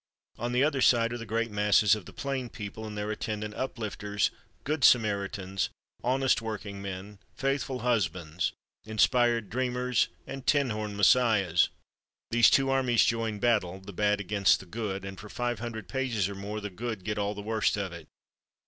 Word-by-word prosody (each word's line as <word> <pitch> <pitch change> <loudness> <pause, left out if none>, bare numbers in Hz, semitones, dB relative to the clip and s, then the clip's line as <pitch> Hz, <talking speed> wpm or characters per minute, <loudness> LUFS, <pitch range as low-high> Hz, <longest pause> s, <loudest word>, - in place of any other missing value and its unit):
On 120 +1 -2
the 125 +2 +3
other 145 -3 +1
side 115 -2 +4
are - - -3
the 115 - -7
great 115 +1 -1
masses 105 0 +4
of 105 -4 -3
the - - -10
plain 135 -3 -3
people, 110 +1 -7
and 105 -1 -7
their 105 +1 -2
attendant 105 0 -4
Uplifters, 105 -5 -2 0.3
Good 150 -1 -1
Samaritans, 100 -5 +2 0.3
Honest 130 0 +2
Workingmen, 100 -2 -6 0.2
Faithful 135 -1 -1
Husbands, 90 -8 0 0.3
Inspired 115 0 +2
Dreamers 125 0 +1 0.2
and 135 -1 -8
tin 140 -4 +3
horn 105 -1 -4
Messiahs. 100 -5 +4 0.6
These 120 0 +6
two 135 0 +3
armies 130 -3 +3
join 115 -2 0
battle, 100 -5 +1
the 95 +1 -10
Bad 105 +2 +2
against 100 -1 +3
the - - -11
Good, 100 -1 -4
and 95 -1 -7
for 105 - -10
five 120 -1 -2
hundred 115 -1 -6
pages 125 -8 0
or 100 - -5
more 100 +2 -5
the 105 -1 -5
Good 110 0 -5
get 105 +1 -2
all 100 +1 -1
the 105 - -6
worst 110 -1 +1
of 95 -3 -3
it. 85 - -10
110 Hz, 170 wpm, -29 LUFS, 100-120 Hz, 0.6 s, These